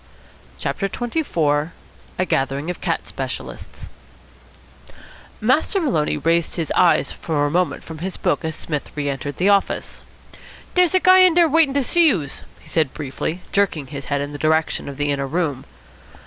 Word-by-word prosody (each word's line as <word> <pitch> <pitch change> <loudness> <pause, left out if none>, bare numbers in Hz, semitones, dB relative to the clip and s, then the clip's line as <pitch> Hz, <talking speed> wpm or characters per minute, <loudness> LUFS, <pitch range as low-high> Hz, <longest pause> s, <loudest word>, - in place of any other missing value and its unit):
CHAPTER 195 - -2
XXIV 170 - -1 0.4
A 185 - +1
GATHERING 140 +2 -1
OF - - -9
CAT - - -1
SPECIALISTS - - -7 1.5
Master 260 - +2
Maloney 200 - 0
raised 165 +2 +1
his 165 -3 -3
eyes 180 -2 +4
for 150 -3 -1
a 145 - -1
moment 180 +2 0
from 160 -1 -9
his 185 +3 -4
book - - 0
as 160 -1 -3
Psmith 150 -4 -4
re 145 -1 -2
entered 140 0 -4
the 190 +3 +2
office. 200 -1 0 0.7
"Dere's 360 0 +3
a - - +6
guy 370 +1 +6
in 365 -3 +6
dere 345 -1 +6
waitin' 305 -2 +3
ter 280 - +2
see 340 +5 +4
youse," 155 - -1 0.2
he - - -19
said 155 -5 0
briefly, 155 +4 -4
jerking 195 -8 +1
his 140 -1 -6
head 140 -1 -1
in 145 0 -4
the 145 - -7
direction 160 -1 +1
of 140 - -8
the 145 0 0
inner 140 -1 -1
room. 145 -4 -2
165 Hz, 170 wpm, -21 LUFS, 145-230 Hz, 1.5 s, a